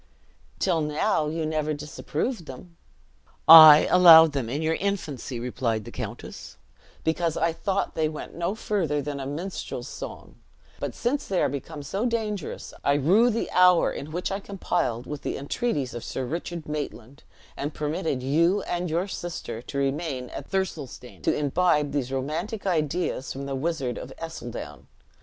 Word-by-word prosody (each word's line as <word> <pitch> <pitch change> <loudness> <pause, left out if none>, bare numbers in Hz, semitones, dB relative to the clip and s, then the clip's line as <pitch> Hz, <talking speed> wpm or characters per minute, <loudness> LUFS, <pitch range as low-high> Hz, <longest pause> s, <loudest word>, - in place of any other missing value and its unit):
"Till 175 -4 +1
now, 150 +2 0
you 160 +1 -2
never 155 -1 -1
disapproved 155 - -4
them." 170 +7 -11 0.7
"I 155 -2 +11
allowed 165 -3 +9
them 135 -5 -3
in 145 +6 -2
your 160 +1 +1
infancy," 160 - -3
replied 115 -3 -2
the - - -9
countess, - - -8 0.5
"because 165 0 0
I 165 0 +1
thought 195 +3 -2
they 155 -1 0
went 155 - -8
no 170 +4 -2
further 185 -10 -1
than 145 0 -4
a 135 - -4
minstrel's 170 +7 -5
song; - - -9 0.4
but - - -4
since 275 +4 -1
they 190 -2 0
are - - +2
become 145 +2 -6
so 195 - -1
dangerous, 215 -6 -3
I 140 - +3
rue 190 - +4
the 230 0 -2
hour 180 -1 +5
in 150 - -7
which 175 +4 -3
I 195 - -2
complied 175 - -2
with 150 -1 -6
the - - -3
entreaties 145 - -2
of 120 - -6
Sir 130 - -4
Richard 165 +3 -5
Maitland, 140 -4 -6 0.3
and 145 +2 -3
permitted 150 -3 -2
you 170 +9 +2
and 175 0 -2
your 170 +5 0
sister 170 - -6
to 140 - -7
remain 135 -2 -2
at - - -8
Thirlestane, 160 -10 -4
to - - +1
imbibe 150 0 +1
these 135 -3 -2
romantic 160 +11 -3
ideas 160 -5 -1
from 135 +1 -5
the 140 - -4
wizard 135 -3 -2
of - - -8
Ercildown. 120 - -7
155 Hz, 160 wpm, -26 LUFS, 140-180 Hz, 0.7 s, I